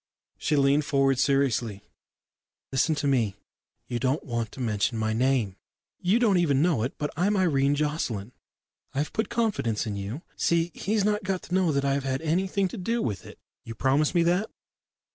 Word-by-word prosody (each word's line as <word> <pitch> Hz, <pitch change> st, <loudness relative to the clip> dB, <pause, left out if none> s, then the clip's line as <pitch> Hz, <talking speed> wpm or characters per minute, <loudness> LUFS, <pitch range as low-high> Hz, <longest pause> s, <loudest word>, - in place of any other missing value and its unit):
She 155 Hz, -, +1 dB
leaned 140 Hz, +1 st, +3 dB
forward 135 Hz, -2 st, +2 dB
seriously. 125 Hz, -7 st, +1 dB, 0.9 s
"Listen 145 Hz, +4 st, +2 dB
to 145 Hz, -, -3 dB
me. 115 Hz, -8 st, +1 dB, 0.5 s
You 120 Hz, -, -3 dB
don't 130 Hz, +4 st, 0 dB
want 115 Hz, -4 st, -3 dB
to -, -, -10 dB
mention 115 Hz, -1 st, 0 dB
my 110 Hz, 0 st, 0 dB
name 120 Hz, -5 st, +1 dB, 0.4 s
you 185 Hz, +5 st, +2 dB
don't 215 Hz, -7 st, +3 dB
even 145 Hz, -6 st, +2 dB
know 165 Hz, -10 st, +2 dB
it, 125 Hz, +4 st, -3 dB
but 150 Hz, -, -3 dB
I'm 200 Hz, +6 st, +1 dB
Irene 145 Hz, -6 st, +2 dB
Jocelyn. 145 Hz, -8 st, -2 dB, 0.6 s
I've 145 Hz, +3 st, -1 dB
put 220 Hz, -, -1 dB
confidence 220 Hz, -, 0 dB
in 105 Hz, -2 st, -3 dB
you. 100 Hz, -, -5 dB
See, 170 Hz, 0 st, +1 dB
he's 210 Hz, 0 st, 0 dB
not 210 Hz, 0 st, +1 dB
got 185 Hz, -1 st, -2 dB
to -, -, -8 dB
know 185 Hz, -3 st, +3 dB
that 140 Hz, -1 st, 0 dB
I've 140 Hz, 0 st, +1 dB
had 135 Hz, +2 st, -2 dB
anything 190 Hz, +4 st, +1 dB
to -, -, -7 dB
do 230 Hz, +6 st, -1 dB
with 105 Hz, -, -3 dB
it. -, -, -12 dB, 0.3 s
You 115 Hz, -, -8 dB
promise 140 Hz, +7 st, +2 dB
me 170 Hz, -, +4 dB
that?" 180 Hz, +5 st, +1 dB
140 Hz, 180 wpm, -27 LUFS, 120-175 Hz, 0.9 s, me